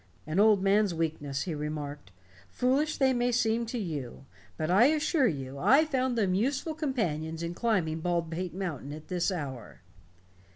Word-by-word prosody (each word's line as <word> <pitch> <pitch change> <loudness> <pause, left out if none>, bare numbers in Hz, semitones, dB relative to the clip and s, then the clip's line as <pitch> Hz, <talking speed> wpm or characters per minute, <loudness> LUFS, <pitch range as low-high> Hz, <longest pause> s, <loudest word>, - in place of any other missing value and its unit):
"An 155 +4 -1
old 210 -2 +5
man's 200 -2 +3
weakness," 145 -4 -2
he 170 - -3
remarked. 150 - -5 0.4
"Foolish, 280 +5 +1
they 265 -2 +3
may 245 0 +1
seem 230 -1 +1
to 245 - -4
you. 145 - -5 0.3
But 155 +2 -1
I 200 +6 +6
assure 305 -2 +2
you 135 -6 -4
I 275 - +5
found 260 -4 0
them 195 -5 +2
useful 265 - 0
companions 170 - -2
in 170 +1 -3
climbing 175 -7 0
Baldpate 170 0 -2
Mountain 160 -7 -4
at 155 +1 -10
this 180 +1 0
hour." 135 - -6
185 Hz, 160 wpm, -29 LUFS, 155-245 Hz, 0.4 s, I